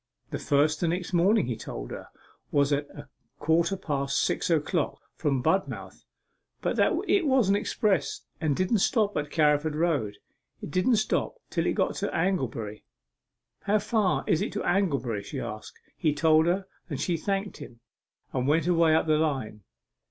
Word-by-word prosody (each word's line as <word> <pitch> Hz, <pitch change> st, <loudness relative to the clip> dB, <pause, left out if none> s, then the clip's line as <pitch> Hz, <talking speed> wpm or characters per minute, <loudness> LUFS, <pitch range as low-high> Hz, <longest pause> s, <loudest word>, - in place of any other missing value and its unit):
The -, -, -3 dB
first 150 Hz, +2 st, +2 dB
the 175 Hz, -, +2 dB
next 175 Hz, +2 st, -2 dB
morning, 195 Hz, +5 st, +4 dB
he 120 Hz, -1 st, -2 dB
told -, -, -7 dB
her, -, -, -7 dB, 0.4 s
was 145 Hz, 0 st, +2 dB
at 145 Hz, +1 st, -1 dB
a 145 Hz, 0 st, -11 dB, 0.3 s
quarter 170 Hz, +4 st, +1 dB
past 140 Hz, -6 st, -2 dB
six -, -, 0 dB
o'clock 160 Hz, 0 st, 0 dB
from 135 Hz, -5 st, -1 dB
Budmouth, 190 Hz, +5 st, -1 dB, 0.5 s
but -, -, -1 dB
that -, -, +3 dB
it 360 Hz, -6 st, +3 dB
was 260 Hz, -7 st, +3 dB
express, 205 Hz, 0 st, 0 dB, 0.2 s
and 155 Hz, -4 st, +1 dB
didn't 185 Hz, -, +1 dB
stop 210 Hz, 0 st, +2 dB
at 145 Hz, 0 st, -2 dB
Carriford 150 Hz, -1 st, +2 dB
Road 150 Hz, -11 st, 0 dB, 0.4 s
it -, -, -7 dB
didn't 185 Hz, -, +3 dB
stop 215 Hz, -, 0 dB, 0.2 s
till -, -, 0 dB
it -, -, +2 dB
got -, -, 0 dB
to -, -, -1 dB
Anglebury. 120 Hz, -, -1 dB, 0.8 s
"How 205 Hz, +1 st, +3 dB
far 210 Hz, -2 st, +1 dB
is 160 Hz, -, +2 dB
it -, -, -2 dB
to -, -, -3 dB
Anglebury?" 140 Hz, -, 0 dB
she -, -, -7 dB
said. 110 Hz, 0 st, -5 dB, 0.3 s
He 155 Hz, -3 st, 0 dB
told 160 Hz, +1 st, +4 dB
her, 190 Hz, +3 st, +1 dB, 0.2 s
and 145 Hz, -, -4 dB
she 175 Hz, -, 0 dB
thanked 195 Hz, +4 st, -2 dB
him, 120 Hz, -, -11 dB, 0.5 s
and 130 Hz, 0 st, -1 dB
went 155 Hz, +2 st, +2 dB
away 165 Hz, -2 st, +4 dB
up 160 Hz, -, +2 dB
the 155 Hz, -1 st, +2 dB
line. 135 Hz, -9 st, -2 dB
160 Hz, 170 wpm, -27 LUFS, 145-190 Hz, 0.8 s, morning